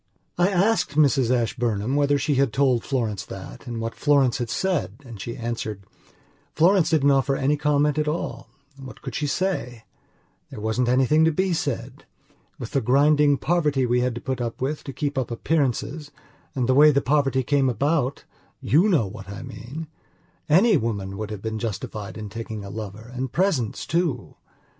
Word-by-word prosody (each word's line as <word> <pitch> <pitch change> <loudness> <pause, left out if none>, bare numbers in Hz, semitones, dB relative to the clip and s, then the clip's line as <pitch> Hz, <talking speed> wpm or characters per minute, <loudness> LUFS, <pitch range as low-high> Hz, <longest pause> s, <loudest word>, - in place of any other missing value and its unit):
I 175 +2 +3
asked 200 -4 +1
Mrs 140 -5 +3
Ashburnham 120 -1 0
whether 145 0 +3
she 145 +1 0
had 135 -2 +2
told 130 -3 +2
Florence 110 -7 -2
that 95 +7 -9
and 120 -1 -4
what 115 0 -3
Florence 140 -4 +2
had 120 -2 -3
said 140 - -1
and 115 -5 -9
she 115 - -6
answered:"Florence 120 - -2
didn't 145 -3 +3
offer 135 0 +2
any 140 +2 +1
comment 150 0 +1
at 150 - 0
all. 155 +3 -3 0.3
What 130 - -11
could 130 - -6
she 150 - -1
say? 140 - -2 0.7
There - - -9
wasn't 110 +3 0
anything 135 +5 +4
to 160 - +4
be 185 +3 0
said. 150 -6 -4 0.5
With 115 - -7
the 135 - +1
grinding 145 +4 +4
poverty 150 -6 +1
we 125 0 +2
had 125 -1 -1
to 120 - -6
put 130 -2 -3
up 115 +1 -4
with 140 +4 -2
to 135 - -5
keep 140 +1 -2
up 125 - -3
appearances, 140 +3 -1 0.5
and 125 -3 0
the 130 - +3
way 150 +3 +7
the 140 -2 +3
poverty 135 -2 +2
came 140 0 +2
aboutyou 140 - 0
know 155 - +3
what 100 0 -9
I 100 +3 -7
meanany 160 - -1
woman 100 -4 -3
would 105 +1 -5
have 105 -2 -7
been 110 -1 -3
justified 105 -1 -5
in 110 -1 -6
taking 110 -1 -6
a 100 - -8
lover 110 +2 -8
and 130 0 -4
presents 160 - 0
too. 155 - -1
130 Hz, 170 wpm, -24 LUFS, 115-150 Hz, 0.7 s, way